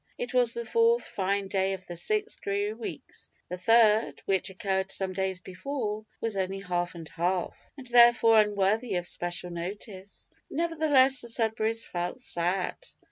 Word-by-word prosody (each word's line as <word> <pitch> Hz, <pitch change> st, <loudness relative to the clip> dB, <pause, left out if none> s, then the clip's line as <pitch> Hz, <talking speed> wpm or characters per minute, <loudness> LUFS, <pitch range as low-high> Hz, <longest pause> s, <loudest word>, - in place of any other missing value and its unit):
It -, -, -4 dB
was 245 Hz, -2 st, +3 dB
the 235 Hz, 0 st, -4 dB
fourth 465 Hz, -, +3 dB
fine 200 Hz, 0 st, -1 dB
day 190 Hz, 0 st, 0 dB
of 185 Hz, -1 st, -7 dB
the 175 Hz, -, -7 dB
six 425 Hz, -, -2 dB
dreary 200 Hz, +1 st, -2 dB
weeks 220 Hz, -10 st, -9 dB, 0.2 s
the 180 Hz, -, -4 dB
third, 225 Hz, +1 st, +4 dB
which 195 Hz, 0 st, 0 dB
occurred 190 Hz, 0 st, -2 dB
some 190 Hz, -1 st, -1 dB
days 190 Hz, -1 st, -2 dB
before, 215 Hz, +2 st, -4 dB
was 225 Hz, -2 st, -2 dB
only 190 Hz, 0 st, -2 dB
half 175 Hz, -2 st, -2 dB
and 165 Hz, -2 st, -8 dB
half; 180 Hz, +2 st, -1 dB, 0.2 s
and 270 Hz, -, -10 dB
therefore 235 Hz, -2 st, +6 dB
unworthy 210 Hz, +1 st, 0 dB
of 175 Hz, 0 st, -2 dB
special 175 Hz, 0 st, -4 dB
notice. 190 Hz, -, -8 dB, 0.2 s
Nevertheless, 295 Hz, -5 st, +3 dB
the 235 Hz, -, -5 dB
Sudberrys 225 Hz, -1 st, 0 dB
felt 175 Hz, +7 st, -4 dB
sad. 180 Hz, -4 st, -1 dB
200 Hz, 155 wpm, -28 LUFS, 185-235 Hz, 0.2 s, therefore